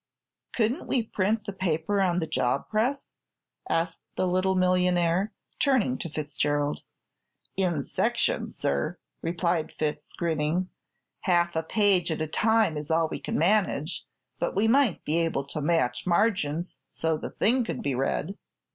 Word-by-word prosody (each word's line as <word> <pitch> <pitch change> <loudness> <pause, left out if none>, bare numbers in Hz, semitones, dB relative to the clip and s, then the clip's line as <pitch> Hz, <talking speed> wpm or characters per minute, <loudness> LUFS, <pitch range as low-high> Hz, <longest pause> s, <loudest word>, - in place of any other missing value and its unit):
"Couldn't 240 +7 0
we 245 - +1
print 215 +1 0
the 200 - -4
paper 185 +1 0
on 180 -2 +2
the 170 - 0
job 135 -3 0
press?" 245 +6 0 0.6
asked 165 0 -1
the - - +1
little 185 +1 +2
millionaire, 180 +1 +2 0.3
turning 255 - +3
to 170 - -5
Fitzgerald. 145 -1 -1 0.7
"In 175 -7 0
sections, - - 0
sir," 70 0 -1 0.2
replied 170 -1 0
Fitz, 150 -1 -3
grinning. 165 +2 0 0.6
"Half 175 -2 +2
a 160 - +2
page 190 0 +2
at 160 - -2
a 155 - 0
time 215 0 +2
is 150 0 -6
all 160 0 +2
we - - -4
can - - -3
manage, 180 -3 +1 0.4
but - - -1
we 205 +3 +3
might 250 -4 +3
be 160 +3 +1
able 165 -4 0
to 150 +2 -5
match 145 -4 +1
margins 175 -5 +1
so 160 0 0
the 155 - -5
thing 245 +4 +2
could 225 - -4
be 140 - 0
read." 135 +8 -1
175 Hz, 150 wpm, -27 LUFS, 155-200 Hz, 0.7 s, turning